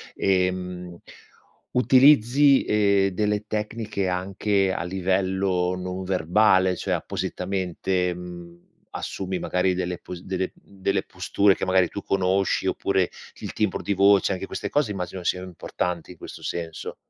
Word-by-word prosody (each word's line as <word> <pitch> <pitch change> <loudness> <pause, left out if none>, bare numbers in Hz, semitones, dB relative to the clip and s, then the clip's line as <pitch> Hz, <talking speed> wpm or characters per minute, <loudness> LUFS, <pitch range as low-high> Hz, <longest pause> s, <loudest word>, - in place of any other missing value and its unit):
ehm, 90 -2 -1 0.7
utilizzi, 135 +1 +5
ehm, 100 -2 +3
delle 105 +2 -1
tecniche 105 -2 -3
anche 95 +1 0
a - - -3
livello 95 0 0
non 90 +1 -5
verbale? 95 +1 +3
Cioè, - - -2
appositamente, 90 -1 -2
mhmm, 85 -1 -10 0.2
assumi 95 -1 -4
magari 90 0 0
delle 90 -1 -3
posi 90 -1 -9
delle, 95 -1 -2
mhmm 100 -1 -20
delle 95 0 +1
posture 95 +2 +2
che - - -3
magari 95 -2 +3
tu 100 - -6
conosci, 95 0 +1
oppure 95 -2 +1 0.3
il - - -6
timbro 105 -4 -1
di 100 - 0
voce? 100 0 +4
Anche 95 +1 -5
queste - - -4
cose 145 -7 +1
immagino 90 -2 -5
sian 90 +1 -1
importanti 90 -1 -4
in 90 - -13
questo - - -10
senso. 85 -2 -5
95 Hz, 135 wpm, -24 LUFS, 90-100 Hz, 0.7 s, utilizzi